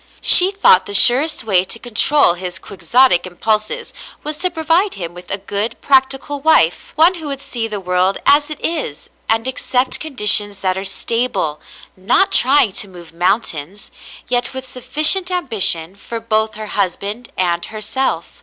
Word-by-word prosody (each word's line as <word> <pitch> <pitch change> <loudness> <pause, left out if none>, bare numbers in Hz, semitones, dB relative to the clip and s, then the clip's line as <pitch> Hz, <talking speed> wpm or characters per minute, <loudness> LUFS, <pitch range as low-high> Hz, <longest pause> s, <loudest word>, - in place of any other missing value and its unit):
She 365 +1 +7
thought 390 - +3
the 205 - -4
surest 265 +9 +5
way 190 -5 +2
to 230 - -6
control 240 0 +2
his 180 0 -6
quixotic 200 -1 +1
impulses 215 +4 -3 0.3
was 300 0 -2
to 365 - -1
provide 335 +4 0
him 175 -2 -7
with 180 0 -13
a 200 - -1
good, 205 +3 -4
practical 270 +1 0
wife, 275 - +2
— - - -36
one 330 +4 +4
who 325 -4 -8
would 275 -1 -5
see 235 -4 -4
the 210 -2 -5
world 180 +1 -1
as 290 +1 +4
it 305 - -7
is 300 - -5 0.2
and 225 +2 0
accept 255 0 -1
conditions 210 -8 +1
that 185 -1 -1
are 190 +1 -5
stable, 200 -6 -2 0.3
not 220 - +2
trying 260 -4 +5
to 200 - -2
move 175 -3 -14
mountains, 175 0 -3 0.4
yet 245 +1 -1
with 260 0 -7
sufficient 305 +9 +2
am 360 -2 -3
bition 180 -4 +1
for 230 +3 -8
both 220 -1 -1
her 215 0 -7
husband 200 +4 -3
and 175 -2 -1
herself. 215 -4 -4
225 Hz, 165 wpm, -16 LUFS, 190-275 Hz, 0.4 s, She